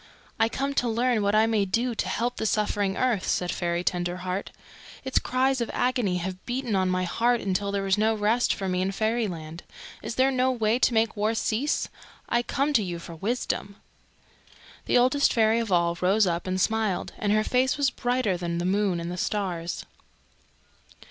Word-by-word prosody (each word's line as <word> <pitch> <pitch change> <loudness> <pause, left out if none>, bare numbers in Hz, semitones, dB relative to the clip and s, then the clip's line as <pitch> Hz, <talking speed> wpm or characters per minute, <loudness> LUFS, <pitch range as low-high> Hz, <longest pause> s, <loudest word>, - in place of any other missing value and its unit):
"I 225 0 +3
come 275 +3 -2
to 245 -3 +1
learn 235 0 +1
what 200 +1 +1
I 215 +1 +5
may 220 -2 +2
do 235 +6 0
to 220 - -2
help 245 +2 -1
the 220 - -1
suffering 205 -2 0
earth," 240 -7 0
said 180 -1 0
Fairy 170 0 -1
Tenderheart. 180 +2 -2 0.6
"Its 265 - +2
cries 260 0 +1
of 235 - -2
agony 245 -7 +1
have 185 +1 -5
beaten 245 -3 -1
on 185 -1 +2
my 185 0 0
heart 235 +7 +1
until 200 0 -1
there 200 -1 -1
was 195 +1 +1
no 220 +1 +2
rest 220 +3 +2
for 195 - -2
me 180 0 0
in 190 +1 0
Fairyland. 190 -8 -2 0.4
Is - - -5
there 265 +1 +3
no 255 0 +2
way 230 -1 +1
to 245 - +2
make 220 0 +2
war 215 +2 0
cease? 230 +6 0 0.4
I 240 - +2
come 275 +4 -1
to 225 - +3
you 175 -2 -4
for 170 0 -9
wisdom." 200 +2 -3 1.1
The - - +3
Oldest 255 +4 +3
Fairy 225 -1 +3
of 225 -3 -3
All 170 -1 +2
rose 195 +4 +4
up 170 0 -2
and 185 0 -1
smiled, 220 -2 0
and 205 -1 0
her 215 0 +3
face 255 +4 +1
was 280 -3 +2
brighter 245 -7 0
than 170 -1 -3
the 175 - -2
moon 195 -1 +1
and 175 +2 -5
stars. 180 -5 -2
215 Hz, 190 wpm, -26 LUFS, 185-240 Hz, 1.1 s, I